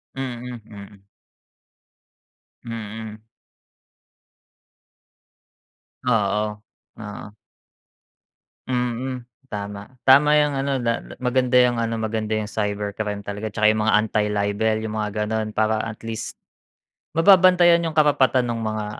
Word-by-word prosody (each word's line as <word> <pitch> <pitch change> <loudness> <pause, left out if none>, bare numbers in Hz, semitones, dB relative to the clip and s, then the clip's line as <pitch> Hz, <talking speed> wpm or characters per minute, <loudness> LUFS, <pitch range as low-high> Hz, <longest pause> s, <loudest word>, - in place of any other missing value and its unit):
Mm, 125 -2 -5
mm. 100 -2 -12 1.6
Mm. 110 -1 -6 2.9
Oo, 105 -2 0 0.4
oo. 105 -1 -8 1.4
Mm, 125 0 -2 0.2
tama. 100 -1 -6 0.2
Tama 140 +3 +7
'yung 150 -1 +2
ano 135 0 -1
na 115 -2 -1 0.2
maganda 125 0 +1
'yung 125 -2 +4
ano, 115 0 -1
maganda 110 -1 -2
'yung 110 - -2
cybercrime 105 -1 -3
talaga 105 +2 -4
tsaka 105 +1 -1
'yung 110 0 -1
mga 110 0 +3
anti-libel 105 +1 0
'yung 110 0 -4
mga 105 -1 -2
gano'n 110 0 -2
para 110 0 +1
at 110 -1 -6
least 115 -1 -5 0.8
mababantayan 180 -1 +6
'yung 165 -1 -4
karapatan 140 -4 +3
no'ng 115 -1 -3
mga 110 -1 -2
110 Hz, 105 wpm, -22 LUFS, 105-125 Hz, 2.9 s, Tama